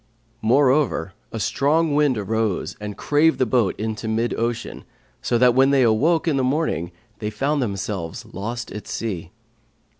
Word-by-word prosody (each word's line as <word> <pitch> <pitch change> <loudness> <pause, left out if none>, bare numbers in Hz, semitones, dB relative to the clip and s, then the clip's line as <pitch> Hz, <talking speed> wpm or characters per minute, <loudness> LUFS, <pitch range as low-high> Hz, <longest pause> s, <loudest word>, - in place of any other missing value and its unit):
Moreover 130 - +2 0.2
a 115 - -4
strong 150 +8 +1
wind 145 -4 +3
arose 110 -1 -1
and 105 -1 -6
crave 155 +2 +3
the 130 - +2
boat 115 -4 +1
into 110 0 -3
mid 115 +2 0
ocean, 115 0 -3 0.4
so 120 - +1
that 125 0 +5
when 135 +2 +4
they 140 -2 +4
awoke 150 +10 +2
in 150 -4 +2
the 130 - +1
morning, 130 - 0 0.3
they 105 - -2
found 140 +7 -1
themselves 100 -6 -4
lost 115 +5 -5
at 105 - -8
sea. 105 -7 -4
120 Hz, 155 wpm, -22 LUFS, 105-140 Hz, 0.4 s, that